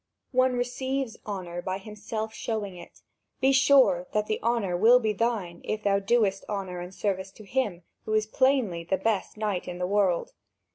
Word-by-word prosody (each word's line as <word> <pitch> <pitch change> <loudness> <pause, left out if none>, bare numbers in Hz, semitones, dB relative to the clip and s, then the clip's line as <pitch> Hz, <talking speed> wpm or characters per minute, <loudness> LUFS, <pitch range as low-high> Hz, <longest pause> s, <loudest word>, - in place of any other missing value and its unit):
One 255 -1 +3
receives 250 0 -2
honour 180 -4 -4
by 185 +1 -2
himself 215 +2 -5
showing 210 -5 -3
it; 175 -1 -13 0.4
be 265 +1 +4
sure 260 -9 +5
that 210 0 +1
the 215 - -2
honour 225 -6 0
will 230 +7 +6
be 220 -3 0
thine, 205 -6 -1
if 215 0 -3
thou 200 -1 +3
doest 200 -1 +2
honour 190 -3 -3
and 175 +1 -7
service 190 -1 -2
to 215 - -13
him 205 -6 -1 0.2
who 215 - -2
is 215 0 +2
plainly 235 -7 +1
the 190 +3 0
best 210 0 -1
knight 210 -4 -2
in 175 - -5
the 180 - -1
world." 190 -2 +1
210 Hz, 180 wpm, -27 LUFS, 185-235 Hz, 0.4 s, will